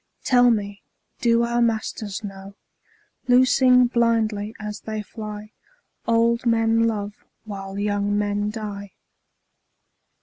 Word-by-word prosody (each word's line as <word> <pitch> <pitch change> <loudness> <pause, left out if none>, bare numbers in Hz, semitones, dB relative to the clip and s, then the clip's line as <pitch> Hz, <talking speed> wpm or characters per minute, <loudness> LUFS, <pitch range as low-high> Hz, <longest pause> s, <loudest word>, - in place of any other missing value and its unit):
Tell 245 -2 +5
me, 205 -3 -1 0.4
do 235 -1 +3
our 235 0 0
masters 220 -3 -2
know, 195 0 -9 0.7
Loosing 250 0 +5
blindly 225 -3 0
as 210 0 -6
they 215 -1 -5
fly, 215 0 -8 0.6
Old 230 +1 +2
men 230 0 +3
love 205 -2 -4 0.2
while 195 -2 -7
young 205 0 0
men 205 0 -1
die? 205 -2 -7
215 Hz, 105 wpm, -23 LUFS, 205-235 Hz, 0.7 s, Tell